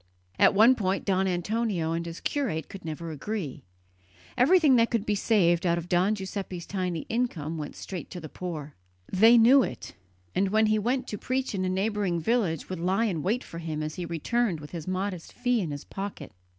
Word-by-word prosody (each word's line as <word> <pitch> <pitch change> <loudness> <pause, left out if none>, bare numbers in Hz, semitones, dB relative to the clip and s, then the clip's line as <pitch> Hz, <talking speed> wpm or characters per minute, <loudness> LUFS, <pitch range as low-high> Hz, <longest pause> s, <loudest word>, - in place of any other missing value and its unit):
On - - +5
one 225 +5 +7
point 195 -6 -1
Don 190 -1 +2
Antonio 185 -1 -1
and 170 +1 -2
his 165 0 -7
curate 220 - -2
could 195 - -9
never 165 +1 -5
agree. 160 -1 -4 0.7
Everything 295 +1 +5
that 230 0 +4
could 230 -3 -1
be 210 - +1
saved 190 -5 +2
out 170 -1 +2
of 170 0 -5
Don 180 +4 +2
Giuseppe's 190 -3 -5
tiny 180 -4 -2
income 165 -10 -2
went 150 - -6
straight 185 -3 -7
to 180 - -7
the 160 - -8
poor. 155 -3 -6 0.4
They 225 +5 +7
knew 250 +4 +7
it, - - -5 0.4
and 195 - +1
when 220 +2 +3
he 215 0 +2
went 250 +5 0
to 210 - -5
preach 260 -1 -2
in 185 -2 -1
a - - 0
neighbouring 195 -2 0
village 180 - 0
would 185 -2 -5
lie 190 +6 +1
in 175 -8 -1
wait 220 - 0
for 165 - -8
him 155 -2 -4
as 155 0 -4
he 180 - -5
returned 175 +3 0
with 150 0 -10
his 165 -2 -6
modest 185 -2 -3
fee 245 -2 +1
in 170 - -3
his 145 0 -5
pocket. 195 -7 -6
190 Hz, 205 wpm, -27 LUFS, 170-220 Hz, 0.7 s, one